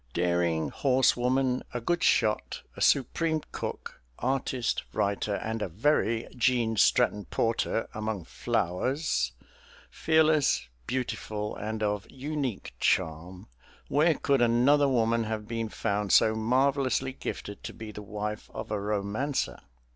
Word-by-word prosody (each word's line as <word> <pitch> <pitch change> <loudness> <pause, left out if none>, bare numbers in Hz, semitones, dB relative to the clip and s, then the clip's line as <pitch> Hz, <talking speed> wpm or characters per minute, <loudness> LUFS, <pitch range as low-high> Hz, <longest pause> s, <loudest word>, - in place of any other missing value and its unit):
Daring 85 -2 +1
horse 130 -2 +3
woman, 125 +1 +1
a - - 0
good 175 +9 0
shot, 105 0 +1
a - - -9
supreme 155 +4 +2
cook, - - -6 0.2
artist, 130 -1 -1
writer, 100 0 0
and 110 +2 -3
a - - -1
very 115 - +1
Gene 120 -2 +2
Stratton 105 0 +3
Porter 115 0 0
among 110 -3 -3
flowers, 90 - -1 0.6
fearless, 155 - +3 0.2
beautiful, 110 -4 -3
and 110 +1 -4
of 105 -1 -1
unique 135 -4 -4
charm 85 +4 -1 0.4
where 155 +2 +3
could 140 -2 +1
another 130 +5 +4
woman 115 -2 +2
have 110 -1 -4
been 115 -1 -3
found 100 -1 -1
so 110 - +6
marvellously 130 +3 +1
gifted 105 -5 -6
to - - -5
be 110 -1 -8
the 105 - -8
wife 105 +1 -5
of - - -6
a 105 - 0
romancer? 105 +7 -2
115 Hz, 125 wpm, -28 LUFS, 105-130 Hz, 0.6 s, so